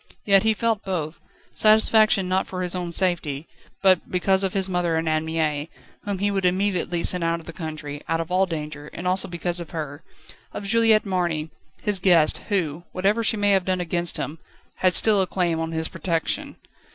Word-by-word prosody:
Yet 195 Hz, -1 st, +5 dB
he 220 Hz, +1 st, +2 dB
felt 225 Hz, -1 st, -1 dB
both 170 Hz, -4 st, -4 dB, 0.3 s
satisfaction 215 Hz, -2 st, +4 dB
not 185 Hz, +1 st, 0 dB
for 185 Hz, -1 st, -4 dB
his 180 Hz, -, -2 dB
own 180 Hz, -2 st, -3 dB
safety, 170 Hz, -5 st, -1 dB, 0.4 s
but 185 Hz, -2 st, +3 dB
because 190 Hz, +1 st, +1 dB
of 190 Hz, -, -1 dB
his 195 Hz, -1 st, +1 dB
mother 175 Hz, -3 st, 0 dB
and 160 Hz, 0 st, -1 dB
Anne 155 Hz, 0 st, 0 dB
Mie, 155 Hz, -1 st, -2 dB, 0.4 s
whom 200 Hz, -1 st, -2 dB
he 205 Hz, +2 st, 0 dB
would 195 Hz, -1 st, -1 dB
immediately 180 Hz, -2 st, 0 dB
send 180 Hz, -2 st, +2 dB
out 165 Hz, 0 st, 0 dB
of 165 Hz, -, -14 dB
the 170 Hz, -, -9 dB
country, 155 Hz, -3 st, -6 dB
out 165 Hz, 0 st, 0 dB
of 165 Hz, +1 st, -5 dB
all 190 Hz, +1 st, +2 dB
danger; 150 Hz, -3 st, -6 dB
and 180 Hz, -, -5 dB
also 185 Hz, +1 st, +2 dB
because 175 Hz, 0 st, -3 dB
of 170 Hz, -, -7 dB
her, 150 Hz, -2 st, -6 dB, 0.5 s
of 205 Hz, -, -6 dB
Juliette 225 Hz, 0 st, +3 dB
Marny, 170 Hz, -5 st, -2 dB, 0.3 s
his 205 Hz, -2 st, +2 dB
guest, 175 Hz, -4 st, +4 dB
who, 170 Hz, -5 st, -1 dB
whatever 200 Hz, +5 st, +1 dB
she 220 Hz, -, +1 dB
may 205 Hz, 0 st, +2 dB
have 190 Hz, -2 st, +2 dB
done 185 Hz, -1 st, 0 dB
against 175 Hz, -1 st, 0 dB
him, 155 Hz, +2 st, -5 dB, 0.4 s
had 185 Hz, -2 st, +2 dB
still 210 Hz, -3 st, +6 dB
a 185 Hz, -, 0 dB
claim 175 Hz, -4 st, -1 dB
on 165 Hz, 0 st, -3 dB
his 160 Hz, 0 st, -2 dB
protection. 165 Hz, -4 st, -2 dB
180 Hz, 200 wpm, -23 LUFS, 165-195 Hz, 0.5 s, still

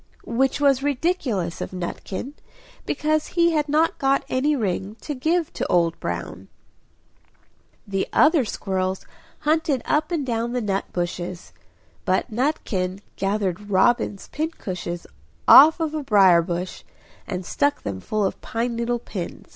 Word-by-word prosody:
Which 260 Hz, +4 st, +1 dB
was 275 Hz, -2 st, +3 dB
ridiculous 270 Hz, -, -1 dB
of -, -, -3 dB
Nutkin, 185 Hz, +7 st, -5 dB, 0.5 s
because 310 Hz, 0 st, 0 dB
he 340 Hz, 0 st, +5 dB
had 300 Hz, -2 st, 0 dB
not 315 Hz, +3 st, +2 dB
got 275 Hz, 0 st, +2 dB
any 285 Hz, +4 st, +1 dB
ring 200 Hz, -3 st, -2 dB
to 300 Hz, -, -4 dB
give 320 Hz, +5 st, 0 dB
to -, -, -2 dB
Old 170 Hz, -2 st, +2 dB
Brown. 85 Hz, +2 st, -5 dB, 1.4 s
The 195 Hz, -1 st, -1 dB
other 310 Hz, -2 st, +5 dB
squirrels 190 Hz, -3 st, -2 dB, 0.4 s
hunted 305 Hz, -4 st, +1 dB
up 300 Hz, +1 st, +1 dB
and 325 Hz, -6 st, -1 dB
down 235 Hz, -1 st, -1 dB
the 250 Hz, -, 0 dB
nut 195 Hz, -2 st, -1 dB
bushes; 175 Hz, -, -4 dB, 0.5 s
but 190 Hz, +6 st, 0 dB
Nutkin 205 Hz, -, -1 dB
gathered 200 Hz, 0 st, -2 dB
robin's 205 Hz, +1 st, +2 dB
pincushions 185 Hz, -, -4 dB, 0.4 s
off 315 Hz, +5 st, +9 dB
a 325 Hz, -, +1 dB
briar 195 Hz, -9 st, +5 dB
bush, 175 Hz, +1 st, -4 dB, 0.4 s
and 185 Hz, -2 st, -4 dB
stuck 285 Hz, +8 st, 0 dB
them 100 Hz, -2 st, -4 dB
full 210 Hz, -, -1 dB
of 190 Hz, -, -3 dB
pine 235 Hz, +1 st, -2 dB
needle 235 Hz, +1 st, 0 dB
pins. 195 Hz, -6 st, -7 dB
230 Hz, 135 wpm, -23 LUFS, 185-290 Hz, 1.4 s, off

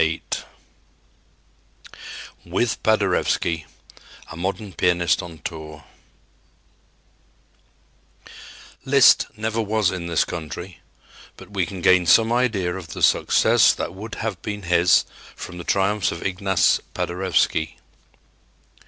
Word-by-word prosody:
VIII 80 Hz, +1 st, 0 dB, 2.2 s
WITH 95 Hz, +7 st, -1 dB
PADEREWSKI 85 Hz, -6 st, +1 dB, 0.7 s
A -, -, -8 dB
MODERN 95 Hz, +3 st, -4 dB
PIANIST 85 Hz, -1 st, +1 dB
ON 85 Hz, -2 st, -10 dB
TOUR 75 Hz, -1 st, -8 dB, 3.0 s
Liszt 135 Hz, -1 st, +5 dB
never 110 Hz, +1 st, -1 dB
was 110 Hz, -2 st, +1 dB
in 90 Hz, -2 st, -5 dB
this 85 Hz, -1 st, +1 dB
country, 85 Hz, +2 st, -7 dB, 0.6 s
but -, -, -14 dB
we 95 Hz, -4 st, -1 dB
can 95 Hz, -3 st, -7 dB
gain 90 Hz, 0 st, +4 dB
some 115 Hz, +6 st, +5 dB
idea 110 Hz, -8 st, 0 dB
of 85 Hz, -5 st, -8 dB
the -, -, -5 dB
success -, -, +4 dB
that -, -, -5 dB
would 105 Hz, +4 st, -8 dB
have 110 Hz, -4 st, -4 dB
been 105 Hz, -1 st, -5 dB
his 90 Hz, 0 st, +3 dB, 0.3 s
from 90 Hz, -, -9 dB
the -, -, -6 dB
triumphs 100 Hz, +2 st, +1 dB
of 85 Hz, -, -7 dB
Ignace 95 Hz, -1 st, +2 dB, 0.2 s
Paderewski. 85 Hz, -3 st, 0 dB
90 Hz, 110 wpm, -22 LUFS, 85-105 Hz, 3.0 s, Liszt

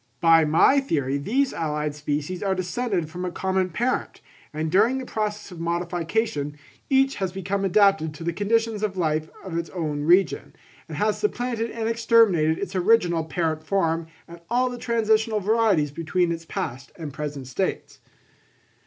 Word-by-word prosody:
By 165 Hz, -1 st, +5 dB
my 165 Hz, -, +5 dB
theory 140 Hz, -, -1 dB
these 260 Hz, -, 0 dB
allied 150 Hz, -2 st, -2 dB
species 150 Hz, +4 st, -3 dB
are 195 Hz, -2 st, 0 dB
descended 185 Hz, -1 st, -2 dB
from 180 Hz, +3 st, -7 dB
a 180 Hz, -, -1 dB
common 190 Hz, 0 st, 0 dB
parent; 240 Hz, +9 st, -2 dB, 0.3 s
and 155 Hz, +1 st, -3 dB
during 220 Hz, +8 st, +4 dB
the 260 Hz, -, -5 dB
process 210 Hz, -3 st, -3 dB
of 175 Hz, -, -9 dB
modification, 170 Hz, -2 st, -2 dB, 0.3 s
each 270 Hz, 0 st, +3 dB
has 190 Hz, -2 st, -2 dB
become 195 Hz, +1 st, -2 dB
adapted 195 Hz, -5 st, +3 dB
to 165 Hz, -, -8 dB
the 170 Hz, +1 st, -1 dB
conditions 220 Hz, +2 st, 0 dB
of 205 Hz, -3 st, -2 dB
life 155 Hz, -2 st, 0 dB
of 185 Hz, -3 st, -6 dB
its 170 Hz, -, -5 dB
own 155 Hz, -5 st, -3 dB
region, 165 Hz, -2 st, +2 dB, 0.3 s
and 155 Hz, -3 st, -7 dB
has 210 Hz, +4 st, +1 dB
supplanted 245 Hz, -, -1 dB
and 225 Hz, -1 st, -3 dB
exterminated 225 Hz, -9 st, +3 dB
its 200 Hz, -, -5 dB
original 180 Hz, -4 st, +3 dB
parent 160 Hz, -1 st, -2 dB
form 165 Hz, -2 st, 0 dB, 0.2 s
and 170 Hz, 0 st, -12 dB
all 250 Hz, +2 st, +1 dB
the 245 Hz, -, -7 dB
transitional 220 Hz, -2 st, +1 dB
varieties 205 Hz, -8 st, +2 dB
between 170 Hz, +3 st, 0 dB
its 165 Hz, 0 st, -5 dB
past 135 Hz, -3 st, -5 dB
and 155 Hz, -5 st, -7 dB
present 145 Hz, -2 st, -5 dB
states. 185 Hz, +9 st, -3 dB
180 Hz, 160 wpm, -24 LUFS, 160-220 Hz, 0.3 s, By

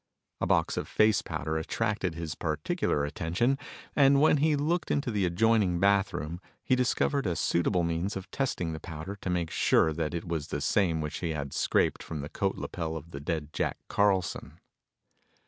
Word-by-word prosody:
A -, -, 0 dB
box -, -, +2 dB
of -, -, -2 dB
face 110 Hz, -2 st, +3 dB
powder 80 Hz, 0 st, -3 dB
attracted 100 Hz, 0 st, -1 dB
his 85 Hz, -2 st, -4 dB
particular 75 Hz, -2 st, -1 dB
attention, 100 Hz, -, 0 dB, 0.4 s
and 140 Hz, -1 st, +6 dB
when 150 Hz, 0 st, +5 dB
he 150 Hz, +1 st, +3 dB
looked 155 Hz, +5 st, 0 dB
into 140 Hz, -4 st, 0 dB
the 100 Hz, -4 st, +1 dB
adjoining 100 Hz, -1 st, +2 dB
bathroom 95 Hz, -5 st, +1 dB, 0.2 s
he 130 Hz, -, +3 dB
discovered 130 Hz, +1 st, +1 dB
a 85 Hz, -, 0 dB
suitable 85 Hz, +2 st, +1 dB
means 85 Hz, +4 st, -1 dB
of 95 Hz, -, -9 dB
testing 90 Hz, -11 st, -1 dB
the 80 Hz, -, -5 dB
powder 80 Hz, +5 st, -7 dB
to 95 Hz, -, -5 dB
make 85 Hz, -2 st, -1 dB
sure 80 Hz, -, +3 dB
that 80 Hz, +1 st, -2 dB
it 85 Hz, -, -4 dB
was 80 Hz, -3 st, -2 dB
the -, -, -3 dB
same 85 Hz, -6 st, +1 dB
which 75 Hz, -1 st, -4 dB
he 85 Hz, -3 st, -2 dB
had 70 Hz, -2 st, -4 dB
scraped -, -, +1 dB
from 75 Hz, -2 st, -5 dB
the 70 Hz, -, -6 dB
coat 95 Hz, +3 st, -1 dB
lapel 80 Hz, -2 st, -4 dB
of 80 Hz, +2 st, -10 dB
the 70 Hz, -, -6 dB
dead 75 Hz, +1 st, -3 dB
Jack -, -, -1 dB
Carlson. 100 Hz, -3 st, +1 dB
90 Hz, 180 wpm, -29 LUFS, 80-110 Hz, 0.4 s, and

